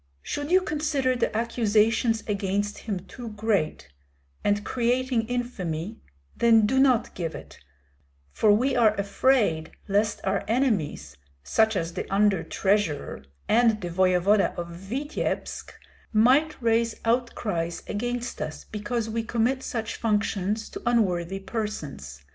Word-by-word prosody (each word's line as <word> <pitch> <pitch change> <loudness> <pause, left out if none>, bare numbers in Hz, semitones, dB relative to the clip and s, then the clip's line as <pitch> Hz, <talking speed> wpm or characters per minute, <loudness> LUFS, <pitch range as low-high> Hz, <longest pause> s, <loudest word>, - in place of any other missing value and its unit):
Should 290 +1 -4
you 370 +2 +5
consider 295 -6 0
the 230 -3 0
accusations 225 0 +2
against 205 0 -1
him 200 -5 -4
too 230 +3 -9
great, 205 - -1 0.6
and 205 0 +1
creating 245 -1 0
infamy, 220 -6 -3 0.4
then 225 -2 +5
do 265 +5 +2
not 260 -4 +3
give 165 -3 -4
it, - - -11 0.7
for 215 - +3
we 255 +6 +2
are 220 -3 +4
afraid 200 -5 +1
lest 205 +1 +1
our - - 0
enemies 220 - 0 0.3
such 220 - +2
as 170 -2 -2
the 185 - -5
under 200 -2 +3
treasurer, 190 - -1 0.2
and 225 -1 +4
the 175 -3 -5
voevoda 185 +3 +3
of 170 0 -5
Vityebsk 220 - -4 0.4
might 260 +8 +3
raise 230 -1 +1
outcries 215 -8 -1
against 245 +3 -3
us 155 0 -5
because 220 +2 -3
we 225 +1 -2
commit 240 +3 0
such 225 -3 -4
functions 210 -1 0
to - - -7
unworthy 195 -6 +1
persons. 155 - -5
220 Hz, 125 wpm, -26 LUFS, 195-240 Hz, 0.7 s, you